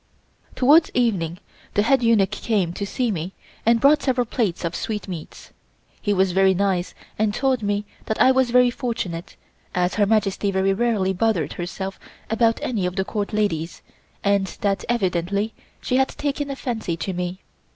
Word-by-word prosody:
Towards 300 +5 +5
evening 190 -9 +1 0.4
the 205 - +4
head 265 +3 +3
eunuch 225 -4 +3
came 205 -5 0
to 200 +2 -4
see 245 +2 -1
me 180 0 -4 0.3
and 230 0 +5
brought 285 +4 +5
several 250 -2 +1
plates 205 -7 -1
of 165 - -2
sweetmeats. 195 -7 -6 0.5
He 205 - 0
was 190 -1 +2
very 190 +1 +4
nice, 185 -2 0 0.2
and 215 -1 +1
told 265 -3 +1
me 205 0 -1 0.2
that 220 - -2
I 260 - +6
was 260 -1 +2
very 250 0 +5
fortunate, 200 -10 -4 0.4
as 180 0 +1
Her 205 -1 +2
Majesty 205 -2 +1
very 195 0 +2
rarely 205 -3 +1
bothered 190 -5 0
herself 190 +2 -5 0.3
about 225 0 +3
any 205 -7 0
of 180 - -5
the 190 -1 0
Court 205 -1 -3
ladies 180 -6 -1 0.4
and 200 -1 +2
that 200 -1 0
evidently 200 -1 0 0.3
she 255 - 0
had 265 0 +4
taken 285 0 -3
a 275 - -3
fancy 220 -10 -3
to 190 +3 -3
me. 180 +1 -4
205 Hz, 170 wpm, -23 LUFS, 185-235 Hz, 0.5 s, I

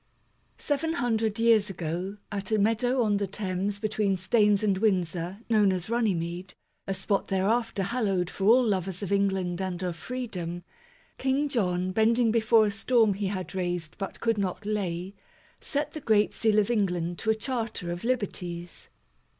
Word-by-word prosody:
SEVEN 310 +3 -1
hundred 225 -7 0
years 225 -3 +4
ago, 180 +2 -4
at 200 0 -3
a 215 - +3
meadow 230 +4 +2
on 210 -2 +2
the 200 0 -1
Thames 195 0 -2
between 210 -2 0
Staines 210 +1 +3
and 195 -3 +2
Windsor, 180 -2 0
known 210 -4 +4
as 185 +3 -3
Runnymede, 180 -6 -1 0.3
a 195 - 0
spot 195 +1 -1
thereafter 205 +2 0
hallowed 195 -4 0
for 195 - -3
all 240 +5 +6
lovers 190 -3 -1
of 200 - -4
England 190 -3 0
and 185 -1 -3
of 180 -2 -2
freedom, 180 -6 -5 0.6
King 270 +2 +1
John, 185 -8 0
bending 225 +3 +3
before 225 -1 +4
a 205 - 0
storm 220 +1 +3
he 200 +1 -2
had 190 -1 -4
raised 175 -4 -3
but 195 -2 -5
could 230 -2 +1
not 195 +1 -2
lay, 190 -3 -2 0.5
set 290 0 -2
the 310 - -7
great 215 -4 +3
seal 220 -2 +2
of 210 +2 +3
England 175 -6 0
to 220 - -2
a 220 - +4
Charter 225 -7 -3
of 175 0 -5
Liberties. 180 -8 -3
200 Hz, 165 wpm, -27 LUFS, 185-225 Hz, 0.6 s, all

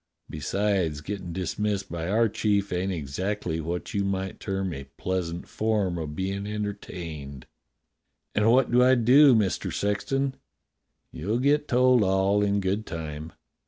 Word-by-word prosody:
Besides, 90 0 0
gettin' 95 +1 -5
dismissed 100 +2 -2
by 85 0 -3
our 115 +3 +3
chief 100 -2 0
ain't 90 +2 -1
exactly 85 +2 -3
what 85 +3 -4
you 100 - +1
might 95 -1 -2
term 95 -2 -2
a 70 -2 -7
pleasant 90 -2 -3
form 105 -5 0
of 75 -2 -5
bein' 100 +2 -3
entertained." 85 -10 -6 0.9
"And 105 +2 +3
what 130 0 +4
do 125 +1 +5
I 130 +1 +6
do. 130 +3 +6
Mister 105 -4 0
Sexton.?" 135 +7 -1 0.8
"You'll 105 +9 -2
get 145 +3 +2
told 125 -1 +4
all 95 +1 +2
in 100 0 +1
good 100 +3 -1
time." 80 -1 -6
100 Hz, 140 wpm, -26 LUFS, 85-105 Hz, 0.9 s, I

